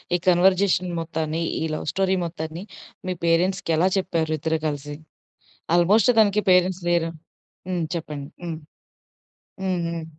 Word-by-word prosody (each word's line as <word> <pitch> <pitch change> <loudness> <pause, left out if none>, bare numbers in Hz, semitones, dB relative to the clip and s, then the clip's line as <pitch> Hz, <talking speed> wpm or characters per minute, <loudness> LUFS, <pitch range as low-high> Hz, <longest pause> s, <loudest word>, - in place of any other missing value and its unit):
ఈ - - +3
కన్వర్జేషన్ 185 0 +3
మొత్తాన్ని, 160 0 -2 0.2
ఈ - - 0
లవ్ - - -4
స్టోరీ 190 0 +2
మొత్తాన్ని 160 +1 -6 0.4
మీ 185 - -1
పేరెంట్స్‌కి 170 +1 +2
ఎలా 185 +3 +3
చెప్పారు 165 -4 0
ఇద్దరు 160 +1 -1
గలిసి? 145 0 -4 0.8
ఆల్‌మోస్ట్ 205 +7 +5
తనికి 210 0 +3
పేరెంట్స్ 180 0 +3
లేరు. 165 -1 +2 0.6
హ్మ్. 175 -3 -1
చెప్పండి. 150 -3 -6 0.2
హ్మ్. 165 -2 -4 1.1
హ్మ్. 185 -2 0
హ్మ్. 170 -1 -4
170 Hz, 130 wpm, -24 LUFS, 160-185 Hz, 1.1 s, ఆల్‌మోస్ట్